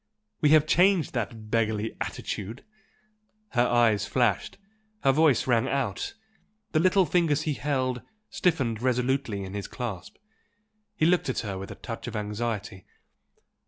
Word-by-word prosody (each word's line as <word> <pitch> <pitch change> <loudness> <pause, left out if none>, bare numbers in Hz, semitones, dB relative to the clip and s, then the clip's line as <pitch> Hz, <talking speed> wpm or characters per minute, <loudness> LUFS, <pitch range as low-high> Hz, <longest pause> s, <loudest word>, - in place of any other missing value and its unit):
We 150 - +4
have 155 0 +6
changed 180 +1 +3
that 110 -3 -4
beggarly 110 -1 0
attitude!" 110 +6 -5 0.8
Her 125 -1 +2
eyes 115 -4 +3
flashed, 120 -7 0 0.5
her 135 - +5
voice 145 -3 +3
rang 120 0 +2
out 135 - -2 0.6
the 155 - +2
little 185 +2 +4
fingers 155 -2 +2
he 155 - 0
held, 130 -1 -1 0.3
stiffened 140 - 0
resolutely 125 -4 0
in 95 0 -7
his 100 -1 -4
clasp. 105 -5 -6 0.8
He 155 - +2
looked 175 -4 +3
at 130 - -1
her 100 -4 -4
with 95 - -7
a - - -7
touch 115 0 -7
of 120 - -5
anxiety. 105 -2 -4
120 Hz, 140 wpm, -27 LUFS, 110-145 Hz, 0.8 s, have